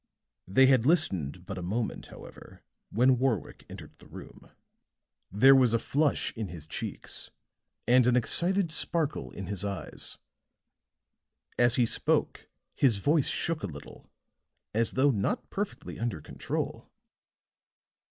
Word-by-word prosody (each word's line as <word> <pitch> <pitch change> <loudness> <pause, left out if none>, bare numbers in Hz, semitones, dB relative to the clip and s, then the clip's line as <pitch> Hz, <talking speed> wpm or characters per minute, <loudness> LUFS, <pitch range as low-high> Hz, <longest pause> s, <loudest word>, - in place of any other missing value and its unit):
They 115 +9 +5
had 130 -2 +4
listened 90 - +1
but 95 0 -6
a - - -6
moment, 105 +6 -3
however, - - -13 0.3
when 125 +2 +3
Warwick 125 -6 -2
entered - - -10
the - - -16
room. - - -12 0.8
There 130 +8 +7
was 125 -4 +4
a - - +5
flush 145 +5 0
in 110 -3 -4
his 85 -3 -9
cheeks 80 - -6 0.6
and 125 0 +5
an 125 - +4
excited 175 - +1
sparkle 155 -1 -2
in 100 - -8
his 95 0 -4
eyes; 100 -1 -5 1.4
as 120 0 +4
he 125 - +3
spoke - - 0 0.2
his 125 -7 +3
voice 145 +7 +2
shook 165 -2 -1
a - - -3
little 70 -4 -12 0.6
as 115 +1 0
though 140 +2 +3
not 105 -5 -2
perfectly 200 0 -5
under 115 -8 -2
control. - - -5
120 Hz, 135 wpm, -29 LUFS, 100-135 Hz, 1.4 s, There